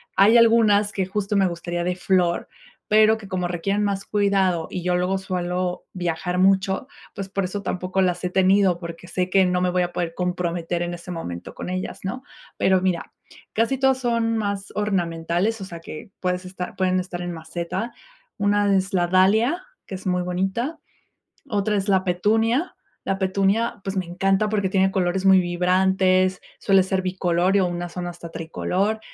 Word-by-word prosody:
hay 215 +4 +6
algunas 220 -3 +4
que, 190 -2 -1
justo, 205 +2 -2
me 195 -1 +4
gustaría 175 0 -3
de 180 0 -1
flor, 180 -2 +1 0.4
pero 215 +1 +5
que 215 - -11
como 185 -2 -2
requieren 195 +4 -1
más 200 -1 -1
cuidado 195 -5 +1
y 180 - -5
yo 180 0 +1
luego 180 +2 +1
suelo 180 -1 -3
viajar 180 0 -2
mucho, 190 +5 +2 0.3
pues, 195 -1 -6
por 195 0 -1
eso 200 +2 -4
tampoco 185 0 -1
las 180 -1 0
he 180 - 0
tenido, 190 -1 +3
porque 170 0 -8
sé 180 0 -2
que 190 0 +4
no 180 0 +1
me 180 - +2
voy 180 0 +1
a 175 - -3
poder 170 -2 -2
comprometer 175 -1 -2
en 175 0 -2
ese 175 +1 -9
momento 90 - -6
con - - -6
ellas, 185 0 -4
¿no? 225 +7 -4 0.3
Pero 190 -1 +3
mira, 185 -2 -1 0.4
casi 230 +5 +1
todas 265 0 +2
son 230 -2 0
más 200 -2 -3
ornamentales, 185 +1 -1
o - - -4
sea, 170 -3 -8
que 165 +5 -9
puedes 180 0 -1
estar 180 -1 -6
pueden 185 -1 +1
estar 180 -1 -5
en 175 0 -4
maceta. 170 +8 -4 0.4
Una 205 -1 +2
es 190 +1 0
la 175 -2 +3
Dahlia, 215 - +3 0.2
que - - -9
es 185 - -7
muy 180 -1 +1
bonita, 195 - -2 0.7
otra 210 -1 0
es 200 0 -2
la 190 -1 +3
Petunia 225 - +1 0.3
la 195 - -1
Petunia, 195 +3 +1
pues, 195 0 -4
me 185 - 0
encanta 195 +4 +1
porque 205 -3 +1
tiene 190 0 +2
colores 190 0 0
muy 190 -1 +7
vibrantes, 185 +1 +2 0.2
suele 195 -1 +4
ser 190 0 -1
bicolor 185 0 +1
y - - +4
unas 175 -1 -2
son 180 -1 -4
hasta 170 -1 -8
tricolor, 190 +6 -2
185 Hz, 180 wpm, -23 LUFS, 180-200 Hz, 0.7 s, muy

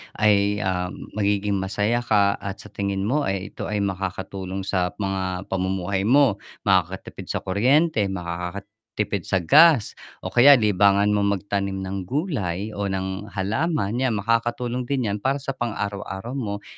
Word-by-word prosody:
ay, 105 -1 +2
ah, 90 -1 -1 0.2
magiging 100 -1 0
masaya 105 +4 0
ka 100 -4 +2
at 100 -1 -5
sa - - -13
tingin 100 -1 -2
mo 140 +7 0
ay 95 0 -3
ito - - -6
ay 105 -1 -1
makakatulong 95 0 -4
sa 90 -2 -1
mga 95 -2 -2
pamumuhay 95 +1 -1
mo, 130 -5 +4 0.2
makakatipid 95 -1 0
sa - - -3
kuryente, 120 - +2
makakatipid 100 +3 -5
sa 95 -3 +1
gas, 150 - +6 0.3
o - - -4
kaya 140 +4 +8
libangan 100 -2 +3
mong 100 -1 +2
magtanim 100 0 -3
ng 95 -1 -5
gulay 110 - -2
o 100 -1 -3
ng 95 +1 -3
halaman, 110 - -1
'yan 130 -4 +1
makakatulong 120 +3 -1
din 130 -6 0
'yan 105 - -3
para 135 +5 0
sa 135 -1 -4
pang 120 -4 -3
araw-araw 100 +2 -4
mo 105 -7 -4
100 Hz, 150 wpm, -23 LUFS, 95-115 Hz, 0.3 s, kaya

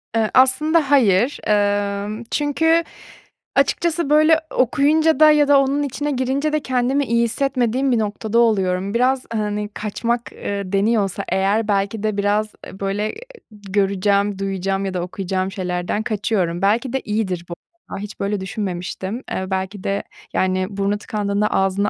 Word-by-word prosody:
Iıı, 220 -1 +2
aslında 285 +4 +3
hayır, 240 -1 +3
emm, 205 +1 0
çünkü 320 +3 +2 0.7
açıkçası 340 -3 +1
böyle 310 +2 +5
okuyunca 300 +5 +3
da 310 -1 +8
ya 295 -1 +4
da 285 -1 +6
onun 275 +2 +1
içine 290 +2 -3
girince 275 +4 -1
de 305 - +2
kendimi 260 +1 0
iyi 235 0 +2
hissetmediğim 255 +1 0
bir 235 - +2
noktada 215 +2 -1
oluyorum. 195 -3 +1
Biraz, 255 +2 +1
hani, 210 -1 -2
kaçmak, 235 +3 -3
ııı, 200 -2 -5
deniyorsa 200 -1 +1
eğer, 195 +4 +1
belki 200 +1 -1
de 215 -1 -1
biraz 210 +1 0 0.3
böyle 200 +2 -2 0.4
göreceğim, 200 0 0
duyacağım 195 0 -2
ya 190 - -3
da 180 - -2
okuyacağım 185 +1 -3
şeylerden 180 +2 -2
kaçıyorum. 195 -5 -1
Belki 230 +6 +1
de 265 - +1
iyidir 195 -5 -2
bu, - - -4 0.4
a, - - -5
hiç 205 +1 -8
böyle 200 +1 -1
düşünmemiştim. 190 +3 -4
Eee, 190 - -2
belki 190 +1 -3
de, 200 0 -1 0.3
yani, 185 0 0
burnu 200 0 -1
tıkandığında 205 0 -1
ağzını 195 +1 +1
210 Hz, 145 wpm, -20 LUFS, 195-260 Hz, 0.7 s, da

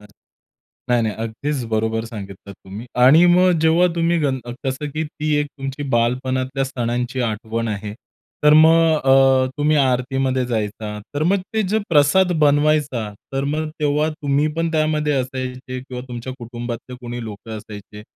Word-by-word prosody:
नाही, 115 +3 -6
नाही, 110 -2 -1
अगदीच 120 +5 -3
बरोबर 110 +1 0
सांगितलं 100 -3 -9
तुम्ही 100 +5 -10 0.2
आणि 155 +7 +7
मग, 180 +1 +5
जेव्हा 165 +3 +4
तुम्ही 170 0 +2
गण 135 -4 0 0.2
कसं 135 +2 -2
की 155 +3 -3
ती 150 0 -2
एक 145 - -1
तुमची 135 +1 -5
बालपणातल्या 130 +3 0
सणांची 125 -1 -2
आठवण 115 +2 -3
आहे, 105 0 -4 0.5
तर 150 - +7
मग 160 +1 +6
अ, 135 -1 +5
तुम्ही 150 +1 +2
आरतीमध्ये 130 -1 +1
जायचा. 105 -2 -3 0.2
तर 145 - -1
मग, 185 +5 +3 0.2
ते 220 - +2
जे 215 - +2
प्रसाद 170 +4 +4
बनवायचा, 145 -6 +2 0.2
तर 135 0 -1
मग 155 +2 -2
तेव्हा 150 +1 +1
तुम्ही 145 -1 0
पण 165 0 0
त्यामध्ये 155 -1 +1
असायचे 130 0 -5
किंवा 125 -1 -8
तुमच्या 120 +1 -6
कुटुंबातले 120 +1 -7
कोणी 120 0 -6
लोकं 110 +1 -8
असायचे? 105 0 -11
130 Hz, 150 wpm, -20 LUFS, 115-150 Hz, 0.5 s, आणि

